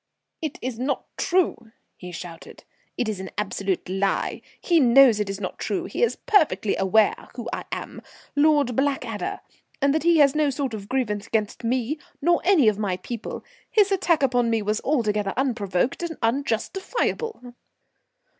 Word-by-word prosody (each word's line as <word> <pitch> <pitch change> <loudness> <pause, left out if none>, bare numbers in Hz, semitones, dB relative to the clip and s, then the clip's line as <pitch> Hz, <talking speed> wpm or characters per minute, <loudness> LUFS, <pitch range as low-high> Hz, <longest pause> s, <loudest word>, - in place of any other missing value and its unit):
"It 310 -3 -4
is 245 -2 -4
not 270 +3 -1
true," 300 -11 0 0.2
he 180 -1 -9
shouted. 170 -1 -9 0.3
"It 245 - 0
is 210 -3 -3
an 190 - -6
absolute 195 -2 -2
lie. 195 +1 -1 0.2
He 340 -2 +3
knows 250 -3 +6
it 210 -1 -1
is 195 0 -4
not 185 -3 -5
true; - - -2
he - - -4
is 475 - +3
perfectly 315 - +2
well - - -2
aware 210 +3 +2
who 240 -2 -6
I - - -4
am, - - -5 0.3
Lord 290 -4 +3
Blackadder; 275 +1 -1 0.4
and 280 0 +3
that 315 - +1
he 340 0 +4
has 285 -3 +6
no 305 -1 +2
sort 270 -3 -2
of 205 -2 -7
grievance 215 -6 -1
against 215 +1 -2
me 255 +5 -1 0.2
nor 345 +3 +2
any 355 - +5
of 210 -1 +3
my 195 -4 -1
people. 230 +4 -6 0.2
His 410 -2 +3
attack 355 -6 +2
upon 245 -3 +2
me 225 -2 +1
was 210 +1 -1
altogether 210 -8 0
unprovoked 230 - 0
and 335 -2 -4
unjustifiable." 275 - -2
245 Hz, 165 wpm, -24 LUFS, 210-295 Hz, 0.4 s, knows